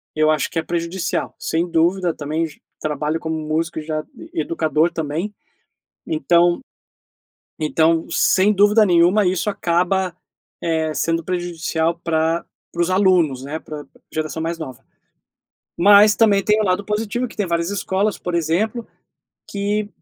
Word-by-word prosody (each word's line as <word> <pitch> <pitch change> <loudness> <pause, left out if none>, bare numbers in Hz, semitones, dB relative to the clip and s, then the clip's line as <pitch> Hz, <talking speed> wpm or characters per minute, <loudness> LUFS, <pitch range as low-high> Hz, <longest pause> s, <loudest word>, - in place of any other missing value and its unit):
eu 155 0 +3
acho 155 -3 0
que 165 - -1
é - - -3
prejudicial, 170 +1 -3
sem 165 +2 -1
dúvida, 170 +2 +2
também 155 +3 -2
j 155 - -12 0.2
trabalho 150 +1 -2
como 160 0 -3
músico, 155 +1 -2
e - - -6
já 155 0 -3
e - - -5
educador 160 +1 +1
também, 160 +6 -3 0.7
então 175 - +2 1.0
então, 160 +1 +2
sem 195 +2 +3
dúvida 210 +2 +5
nenhuma, 180 +3 +4
isso 185 +3 0
acaba, 180 -1 0 0.5
eh, 160 -1 0
sendo 165 0 0
prejudicial 170 -1 -2
pra 165 0 0 0.3
para 175 - -1
os 170 - -1
alunos, 180 -9 +3
né, 150 +3 -5
pra 150 -2 -8 0.3
geração 155 0 -3
mais 165 +1 -2
nova, 130 -6 -8 0.9
mas 205 +3 +7
também, 205 -3 +4
tem 215 +2 +3
o - - 0
lado 185 +1 0
positivo 220 +4 -2
que - - -14
tem 205 - 0
várias 170 0 0
escolas, 200 +1 -1
por 180 -1 -4
exemplo, 200 +9 -1 0.6
que 205 +1 -1
170 Hz, 145 wpm, -20 LUFS, 160-195 Hz, 1.0 s, mas